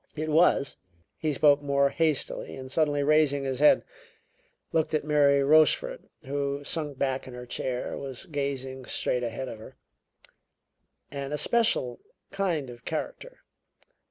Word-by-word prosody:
It 155 Hz, 0 st, -3 dB
was" 155 Hz, -3 st, +3 dB, 0.4 s
he 155 Hz, -, 0 dB
spoke 145 Hz, 0 st, +4 dB
more 140 Hz, -1 st, +2 dB
hastily 155 Hz, -1 st, -1 dB
and, 130 Hz, -1 st, -9 dB
suddenly 145 Hz, -2 st, +1 dB
raising 145 Hz, -1 st, +3 dB
his 135 Hz, -1 st, -3 dB
head, 150 Hz, -, +5 dB, 0.9 s
looked 160 Hz, -1 st, +1 dB
at 155 Hz, -, 0 dB
Mary 145 Hz, -2 st, +4 dB
Rochefort, 155 Hz, -, +3 dB, 0.2 s
who, 140 Hz, +1 st, -2 dB
sunk 150 Hz, -2 st, -4 dB
back 135 Hz, -1 st, -1 dB
in 125 Hz, -, -9 dB
her 125 Hz, 0 st, -8 dB
chair, 125 Hz, +1 st, -3 dB
was 135 Hz, +3 st, -7 dB
gazing 135 Hz, -4 st, -4 dB
straight 125 Hz, 0 st, -1 dB
ahead 120 Hz, +2 st, -4 dB
of 110 Hz, -, -7 dB
her 110 Hz, -, -12 dB, 1.4 s
"an 140 Hz, 0 st, -5 dB
especial 150 Hz, -, +1 dB, 0.3 s
kind 170 Hz, -10 st, -1 dB
of 120 Hz, -1 st, -13 dB
character. -, -, -5 dB
140 Hz, 135 wpm, -27 LUFS, 130-155 Hz, 1.4 s, head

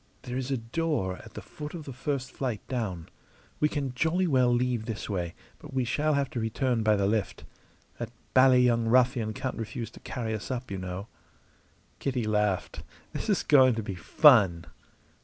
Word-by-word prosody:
There 125 Hz, -, -5 dB
is 130 Hz, 0 st, -3 dB
a 135 Hz, -, 0 dB
door 115 Hz, -, -2 dB
at 110 Hz, -, -14 dB
the -, -, -7 dB
foot 150 Hz, 0 st, -8 dB
of 165 Hz, -, -6 dB
the 135 Hz, -, -7 dB
first 130 Hz, 0 st, -3 dB
flight 125 Hz, -6 st, -4 dB
down. 100 Hz, -10 st, -3 dB, 0.5 s
We 150 Hz, -, +3 dB
can 140 Hz, -4 st, -3 dB
jolly 165 Hz, +8 st, +1 dB
well 130 Hz, -6 st, +3 dB
leave 120 Hz, -2 st, 0 dB
this 110 Hz, -2 st, -4 dB
way, 90 Hz, -4 st, -3 dB, 0.2 s
but 145 Hz, -3 st, -11 dB
we 130 Hz, -2 st, +1 dB
shall 150 Hz, +5 st, +1 dB
have 140 Hz, -1 st, +1 dB
to 120 Hz, -, -3 dB
return 115 Hz, +2 st, 0 dB
by 110 Hz, -1 st, +3 dB
the 100 Hz, -1 st, +1 dB
lift. 105 Hz, 0 st, -1 dB, 0.6 s
That 120 Hz, -2 st, -4 dB, 0.2 s
bally 130 Hz, -1 st, +6 dB
young 115 Hz, -2 st, +2 dB
ruffian 125 Hz, -2 st, +3 dB
can't 130 Hz, +4 st, -4 dB
refuse 115 Hz, +1 st, -5 dB
to -, -, -13 dB
carry 115 Hz, -3 st, -4 dB
us 110 Hz, -, -5 dB
up, 125 Hz, -3 st, -4 dB
y' 95 Hz, -, -3 dB
know!" 90 Hz, +2 st, -5 dB, 0.9 s
Kitty 130 Hz, -3 st, -1 dB
laughed. 105 Hz, -3 st, 0 dB, 0.3 s
"This -, -, -4 dB
is -, -, +2 dB
going 130 Hz, -4 st, +5 dB
to 115 Hz, -, -3 dB
be 100 Hz, -, -4 dB
fun!" 95 Hz, -, +5 dB
120 Hz, 190 wpm, -28 LUFS, 110-130 Hz, 0.9 s, bally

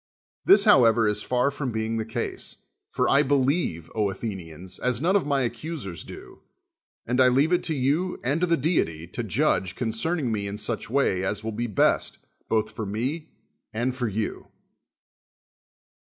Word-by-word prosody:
This, 390 Hz, -6 st, +7 dB
how 135 Hz, -, +7 dB
ever, 115 Hz, -1 st, +4 dB
is 105 Hz, 0 st, 0 dB
far 125 Hz, +4 st, +1 dB
from 140 Hz, -2 st, -3 dB
being 110 Hz, 0 st, -2 dB
the 110 Hz, 0 st, -3 dB
ease: -, -, -4 dB, 0.3 s
for -, -, 0 dB
I 140 Hz, -, +5 dB
believe, 135 Hz, -, 0 dB
Athenians, 95 Hz, -5 st, -4 dB
as 125 Hz, -2 st, 0 dB
none 175 Hz, +7 st, +2 dB
of 195 Hz, -, +2 dB
my 140 Hz, -2 st, +2 dB
accusers 120 Hz, -, -4 dB
do, -, -, -12 dB, 0.6 s
and 125 Hz, +3 st, +1 dB
I 130 Hz, -, +7 dB
leave 140 Hz, +7 st, +3 dB
it 175 Hz, -, +3 dB
to 160 Hz, -, -1 dB
you 145 Hz, +8 st, 0 dB
and 140 Hz, +7 st, 0 dB
to 180 Hz, -, +2 dB
the 170 Hz, -1 st, +3 dB
deity 85 Hz, -, 0 dB
to 90 Hz, -, -5 dB
judge 110 Hz, -, 0 dB
concern 125 Hz, +9 st, -1 dB
ing 125 Hz, -6 st, -1 dB
me 100 Hz, -2 st, -2 dB
in 100 Hz, +1 st, -5 dB
such 105 Hz, 0 st, -2 dB
way 115 Hz, -8 st, +1 dB
as 105 Hz, +2 st, -2 dB
will 110 Hz, -, -3 dB
be 120 Hz, +3 st, -3 dB
best 105 Hz, -, +1 dB, 0.3 s
both 110 Hz, -1 st, +1 dB
for 110 Hz, -1 st, -5 dB
me 130 Hz, +10 st, -3 dB, 0.4 s
and 120 Hz, +3 st, -1 dB
for 125 Hz, -2 st, -1 dB
you. 105 Hz, +1 st, -3 dB
120 Hz, 175 wpm, -25 LUFS, 105-140 Hz, 0.6 s, This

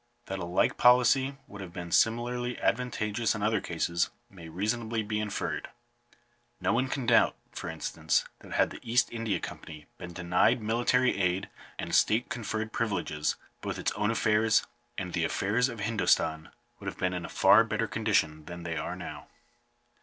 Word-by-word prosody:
That 95 Hz, 0 st, -4 dB
a 85 Hz, -, -3 dB
like 90 Hz, +1 st, +1 dB
policy 125 Hz, +2 st, +5 dB
would 100 Hz, -1 st, -10 dB
have 90 Hz, -3 st, -8 dB
been 85 Hz, -1 st, -6 dB
similarly 120 Hz, +3 st, +1 dB
advantageous 115 Hz, -2 st, 0 dB
in 105 Hz, -, -4 dB
other 110 Hz, +1 st, +2 dB
cases, 85 Hz, +1 st, 0 dB, 0.2 s
may 85 Hz, -4 st, -11 dB
reasonably 110 Hz, +5 st, -1 dB
be 105 Hz, 0 st, -2 dB
inferred. 105 Hz, -1 st, -3 dB, 0.9 s
No -, -, +1 dB
one 125 Hz, +3 st, +1 dB
can 135 Hz, -1 st, -3 dB
doubt, 115 Hz, 0 st, +4 dB, 0.2 s
for -, -, -6 dB
instance, -, -, 0 dB
that -, -, -10 dB
had -, -, +2 dB
the -, -, -8 dB
East 120 Hz, +2 st, +2 dB
India 115 Hz, -3 st, -1 dB
Company 75 Hz, -1 st, -8 dB
been 90 Hz, -, -7 dB
denied 90 Hz, +7 st, +2 dB
military 120 Hz, +2 st, +2 dB
aid 90 Hz, +1 st, 0 dB, 0.3 s
and 85 Hz, -, -5 dB
state 110 Hz, +6 st, +3 dB
conferred 110 Hz, -3 st, -3 dB
privileges, 100 Hz, -9 st, -1 dB, 0.3 s
both -, -, -4 dB
its -, -, -1 dB
own 105 Hz, 0 st, 0 dB
affairs, 110 Hz, -1 st, +3 dB, 0.3 s
and 90 Hz, -2 st, -4 dB
the 85 Hz, -, 0 dB
affairs 105 Hz, +9 st, +1 dB
of 115 Hz, -3 st, -7 dB
Hindostan, 80 Hz, -7 st, +1 dB, 0.3 s
would -, -, -9 dB
have -, -, -4 dB
been 90 Hz, 0 st, 0 dB
in 90 Hz, -1 st, -3 dB
a 80 Hz, -, -6 dB
far 115 Hz, -, +6 dB
better 110 Hz, 0 st, -1 dB
condition 95 Hz, -10 st, 0 dB
than 85 Hz, -1 st, -8 dB
they 85 Hz, -1 st, -3 dB
now -, -, -2 dB
are. -, -, -6 dB
105 Hz, 170 wpm, -29 LUFS, 90-115 Hz, 0.9 s, far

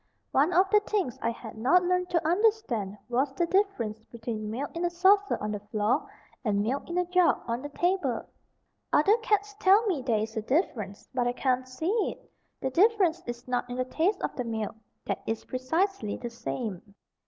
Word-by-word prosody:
One 290 Hz, +6 st, +3 dB
of 370 Hz, +2 st, +4 dB
the 420 Hz, -, +7 dB
things 410 Hz, -, -2 dB
I -, -, +1 dB
had 230 Hz, -1 st, -7 dB
not 350 Hz, +11 st, +4 dB
learned 360 Hz, 0 st, +1 dB
to 335 Hz, -3 st, +1 dB
understand 345 Hz, -, +1 dB
was 260 Hz, +3 st, +1 dB
the 345 Hz, -, +2 dB
difference 340 Hz, -, 0 dB
between 225 Hz, -2 st, -5 dB
milk 265 Hz, +8 st, -4 dB
in 340 Hz, -, -2 dB
a 350 Hz, -, +2 dB
saucer 385 Hz, +4 st, +4 dB
on 210 Hz, -, -3 dB
the 210 Hz, -, -3 dB
floor, 210 Hz, +2 st, 0 dB, 0.3 s
and 205 Hz, -3 st, +1 dB
milk 265 Hz, +9 st, -2 dB
in 345 Hz, -, -2 dB
a 360 Hz, -, +2 dB
jug 360 Hz, 0 st, +3 dB
on 235 Hz, +1 st, -2 dB
the 290 Hz, -, -6 dB
table. 345 Hz, -6 st, 0 dB, 0.6 s
Other 395 Hz, +8 st, +5 dB
cats 420 Hz, -2 st, 0 dB
tell 400 Hz, +4 st, +5 dB
me 360 Hz, -10 st, 0 dB
there 240 Hz, -4 st, +1 dB
is 220 Hz, +1 st, -4 dB
a 220 Hz, -, -1 dB
difference, 215 Hz, -, -1 dB
but 245 Hz, -2 st, +1 dB
I 245 Hz, -, +1 dB
can't 255 Hz, 0 st, 0 dB
see 315 Hz, +8 st, -2 dB, 0.2 s
it. -, -, -11 dB, 0.3 s
The 265 Hz, -, -1 dB
difference 370 Hz, -, +3 dB
is 240 Hz, +1 st, -6 dB
not 245 Hz, 0 st, -1 dB
in 245 Hz, -, -4 dB
the 255 Hz, -, 0 dB
taste 335 Hz, +10 st, 0 dB
of -, -, -2 dB
the 250 Hz, -, -2 dB
milk 225 Hz, -2 st, -3 dB, 0.3 s
that -, -, -2 dB
is 225 Hz, -, -2 dB
precisely 260 Hz, -, -1 dB
the 240 Hz, -1 st, -6 dB
same. 210 Hz, -4 st, -5 dB
265 Hz, 200 wpm, -28 LUFS, 230-360 Hz, 0.6 s, the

